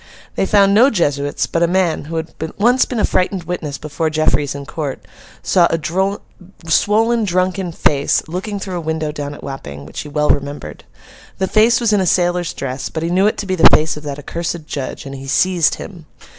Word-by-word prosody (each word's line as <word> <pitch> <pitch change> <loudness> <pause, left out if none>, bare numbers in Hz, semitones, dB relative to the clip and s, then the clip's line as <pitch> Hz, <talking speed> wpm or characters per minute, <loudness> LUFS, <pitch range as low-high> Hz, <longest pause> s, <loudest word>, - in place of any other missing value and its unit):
They 195 - 0
found 200 -1 +4
no 240 +6 +6
Jesuits; 145 - 0
but 165 - -2
a 170 - +4
man, 175 -4 0
who 165 +2 -6
had 160 0 -4 0.2
once 245 +5 +4
been 245 - -3
a - - +3
frightened 185 0 0
witness 160 -5 -4
before 155 +3 -2
Jeffreys 155 -2 +1
in 140 0 -6
court, 145 -2 -5 0.4
saw 175 -2 +4
a 165 - -1 0.9
swollen, 225 +7 +3
drunken 185 -1 0
face 145 -2 +1
looking 195 +5 -4
through 190 -2 -4
a - - -3
window 160 -1 -2
down 145 -1 -5
at - - -13
Wapping, 70 - -7
which 75 - -8
he 150 - -6
well 150 0 +2
remembered. 140 - -4 0.5
The 190 - 0
face 225 +3 +4
was 230 -3 +1
in 205 - +3
a 185 - 0
sailor's 175 0 +1
dress, 130 -1 -4
but 160 - -4
he 170 - -1
knew 190 +3 +3
it 215 - 0
to 210 - -4
be 185 - -2
the 175 - +7
face 155 0 +3
of 150 - -8
that 145 -2 -5
accursed 170 +2 -4
judge, 140 -2 -5
and 135 - -7
he 135 0 -8
seized 175 +3 +2
him. 170 -6 -10
165 Hz, 210 wpm, -18 LUFS, 145-190 Hz, 0.9 s, the